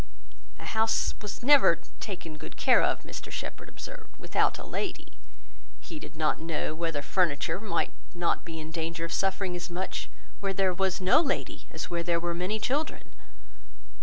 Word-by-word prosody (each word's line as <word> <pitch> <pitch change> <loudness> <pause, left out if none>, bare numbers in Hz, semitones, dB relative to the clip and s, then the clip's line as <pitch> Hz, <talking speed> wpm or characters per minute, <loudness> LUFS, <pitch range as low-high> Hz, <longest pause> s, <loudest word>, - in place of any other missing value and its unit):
A - - -9
house 220 0 +2
was 210 +2 -5
never 275 -9 +8 0.2
taken 180 -6 -5
good 155 - -8
care - - +6
of, - - +2
Mr - - -7
Shepherd - - -5
observed, - - -9
without - - +2
a - - -8
lady: 390 -3 -4 0.6
he 320 - -7
did 165 - -10
not 155 -1 +2
know, 160 -1 -1
whether 160 -3 -1
furniture 165 0 +2
might 200 -6 0 0.2
not 175 -1 +1
be 165 -1 -6
in 155 0 -6
danger 165 0 -2
of 170 - -4
suffering 195 -1 +1
as 175 - -4
much 180 +2 -3 0.3
where 195 -1 0
there 190 -1 +3
was 190 +1 +1
no 190 - +6
lady, 275 -5 -2
as - - -5
where 170 -1 +1
there 170 0 +2
were 170 0 -1
many 180 +5 0
children. 285 +8 -1
180 Hz, 170 wpm, -29 LUFS, 165-210 Hz, 0.6 s, never